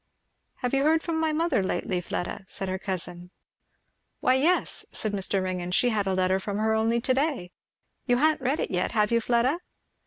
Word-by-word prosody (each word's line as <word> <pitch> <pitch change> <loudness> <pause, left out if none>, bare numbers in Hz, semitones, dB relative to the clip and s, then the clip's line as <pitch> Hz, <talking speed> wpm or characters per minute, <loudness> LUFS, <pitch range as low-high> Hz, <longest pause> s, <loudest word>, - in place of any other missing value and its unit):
"Have 250 -1 -3
you 275 - +3
heard 320 +2 +3
from 330 -2 -1
my 320 -1 +1
mother 325 -7 +1
lately, 185 -1 -1
Fleda?" 180 +2 -4
said 195 - -5
her 185 0 -2
cousin. 180 -2 -4 0.9
"Why 255 - +3
yes," 315 +8 +1
said 215 - -1
Mr. 195 -1 0
Ringgan, 180 -1 -3
"she 245 +7 +3
had 210 -4 0
a 190 - +1
letter 185 +1 +2
from 200 +1 -4
her 220 +1 +1
only 225 +2 +2
to 255 +2 +1
day. 265 - -1 0.6
You 245 -1 +3
ha'n't 305 +2 +3
read 270 +4 0
it - - -2
yet, 180 +2 -1
have 210 -1 +2
you, 230 0 +3
Fleda?" 245 +7 +2
220 Hz, 195 wpm, -27 LUFS, 190-270 Hz, 0.9 s, you